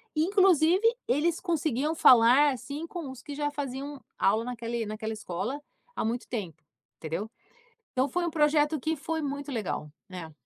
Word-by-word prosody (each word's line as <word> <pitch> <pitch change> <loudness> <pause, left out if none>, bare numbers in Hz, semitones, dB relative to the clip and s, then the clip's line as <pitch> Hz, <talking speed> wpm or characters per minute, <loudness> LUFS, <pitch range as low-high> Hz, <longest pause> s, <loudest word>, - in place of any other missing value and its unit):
Inclusive, 365 +2 +4 0.2
eles 320 +5 +1
conseguiam 310 -4 0
falar, 255 +2 +7
assim, 285 +6 -6
com 335 -4 -6
os 260 -1 -9
que 290 - -8
já 290 0 -1
faziam 280 0 -5 0.2
aula 215 +3 +2
naquele 235 -1 -3
naquela 220 +1 -4
escola 215 +7 -4 0.3
há - - -1
muito 235 +2 -2
tempo, 180 - -5 0.4
entendeu? 165 +8 -4 0.6
Então, 260 +2 +1
foi 345 +6 -1
um 340 - -1
projeto 300 0 +2
que 320 +4 0
foi 320 +2 -3
muito 285 0 -4
legal, 205 -9 -3 0.2
né. 180 -4 -8
280 Hz, 155 wpm, -28 LUFS, 230-310 Hz, 0.6 s, falar